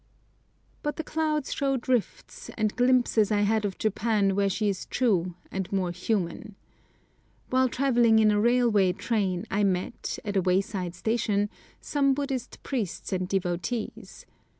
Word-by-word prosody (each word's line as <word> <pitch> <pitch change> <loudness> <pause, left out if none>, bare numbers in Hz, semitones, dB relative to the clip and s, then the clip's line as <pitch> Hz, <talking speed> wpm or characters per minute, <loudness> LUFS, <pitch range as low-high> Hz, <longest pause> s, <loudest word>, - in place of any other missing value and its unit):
But 295 - -2
the 320 - -4
clouds 310 -2 -1
showed 270 -3 -1
rifts, 250 -4 -2
and 215 -2 0
glimpses 245 -4 +3
I 205 -1 +2
had 215 +1 +2
of 195 -2 -3
Japan 215 -2 +1
where 200 0 +2
she 210 +2 -1
is 195 -2 -2
true 185 -8 +1 0.2
and 190 -2 -4
more 190 -3 0
human. 195 +2 -3 1.0
While 260 0 +3
travelling 240 -4 +3
in 215 -1 +5
a 205 0 +2
railway 230 -6 +3
train 190 -4 -1
I 205 +1 +1
met, 190 +3 -1
at 205 -1 -3
a 190 - +3
wayside 185 -1 0
station, 210 0 0 0.3
some 275 -2 +1
Buddhist 270 -3 -4
priests 220 - -3
and 185 -1 -2
devotees. 195 +4 -3
210 Hz, 145 wpm, -27 LUFS, 195-245 Hz, 1.0 s, in